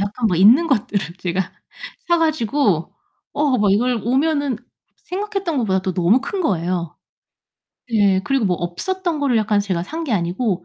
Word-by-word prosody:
약간 210 +4 -1
뭐 180 -5 +1
있는 235 - +6
것들을 205 - -1
제가 180 +1 -2 0.6
사 345 0 +4
가지고 255 - +1 0.4
어, 285 -4 +1
막 205 -2 +3
이걸 240 +2 +1
오면은 280 +1 +1 0.4
생각했던 390 -4 -4
것보다도 190 -5 0
너무 185 +8 +3
큰 375 +8 -4
거예요. 175 - -1 1.0
예, 200 -3 +3
그리고 270 -5 +1
뭐 180 -3 +1
없었던 340 - -3
거를 275 -4 +1
약간 215 -1 +2
제가 185 -4 -2
산 320 - -5
게 270 - -2
아니고 180 0 -1
220 Hz, 305 characters per minute, -20 LUFS, 190-290 Hz, 1.0 s, 있는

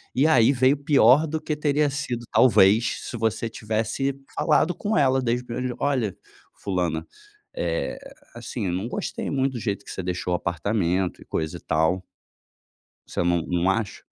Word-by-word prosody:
E 135 - +3
aí, 125 -5 +5
veio 130 +1 +3
pior 145 0 +4
do 160 +1 -2
que 155 - -3
teria 150 0 +1
sido, 135 -4 -4
talvez, 110 -1 +4
se - - -6
você 115 0 -1
tivesse 110 +5 -2 0.2
falado 155 +2 +2
com 215 +1 -1
ela 130 -1 +3
desde 125 0 0
o - - -21
primeiro 125 +1 -3
dia: 125 - -4
"Olha 125 -9 0 0.4
fulana, 90 -5 -2 0.5
eh, - - -2 0.4
assim, 120 -1 -5
eu 90 - -1
não 95 +6 -2
gostei - - -4
muito 135 -1 0
do 120 - -4
jeito 100 -3 -3
que - - -8
você - - -4
deixou 90 0 -2
o - - +3
apartamento 90 +1 -1
e - - -13
coisa 80 -1 -3
e - - -14
tal". 80 +4 +1 1.0
Você - - -2
não 85 -1 +2
não 90 +1 +1
acha? 105 +1 -2
115 Hz, 180 wpm, -24 LUFS, 95-135 Hz, 1.0 s, aí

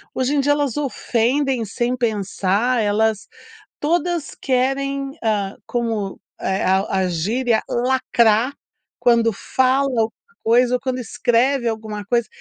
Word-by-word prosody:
hoje 260 +3 0
em - - +2
dia 290 +1 +3
elas 290 -4 -1
ofendem 260 -1 0
sem 240 +4 -1
pensar, 220 0 0
elas 215 0 +1 0.5
todas 340 0 -1
querem, 275 +1 0
hã, 205 -3 0
como 225 -5 -2 0.2
é? 190 0 -1
A 190 +1 +3 0.2
a 185 - +1
gíria 220 +8 0
lacrar, 240 -1 +2 0.5
quando 235 -1 +3
fala 260 +6 +1
alguma 225 -4 0 0.3
coisa 245 +2 +4
ou 250 - 0
quando 260 -1 -2
escreve 245 +2 +1
alguma 215 -2 -4
coisa, 235 +1 +1
240 Hz, 125 wpm, -21 LUFS, 220-265 Hz, 0.5 s, coisa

